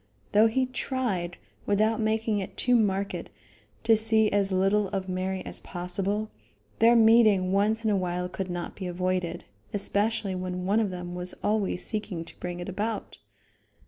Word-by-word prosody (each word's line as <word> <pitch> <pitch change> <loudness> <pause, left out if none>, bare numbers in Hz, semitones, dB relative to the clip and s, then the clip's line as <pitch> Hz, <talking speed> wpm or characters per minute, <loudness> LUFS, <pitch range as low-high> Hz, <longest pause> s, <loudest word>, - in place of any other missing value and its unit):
Though 215 +2 +6
he 255 +4 +1
tried, 245 -9 -2 0.3
without 215 +2 +2
making 220 -1 +1
it 190 - -6
too 250 -1 +3
marked, 200 -3 0 0.5
to 225 0 +5
see 220 0 +3
as 200 -1 +1
little 195 +2 +2
of 190 0 -3
Mary 185 +1 -2
as - - -4
possible, 195 +4 -3 0.5
their 230 +1 +6
meeting 220 -5 +5
once 215 +3 +2
in 215 - +3
a - - +3
while 180 -1 -1
could 185 +1 -5
not 175 -1 -4
be 190 - -5
avoided, 180 0 -2 0.3
especially 205 0 0
when 180 0 -4
one 205 +4 +3
of 215 -3 +1
them 180 -1 -6
was 180 0 -4
always 205 -4 +1
seeking 195 -6 -3
to - - -15
bring 175 0 -5
it 175 - -5
about. 210 +4 -4
200 Hz, 165 wpm, -27 LUFS, 185-220 Hz, 0.5 s, Though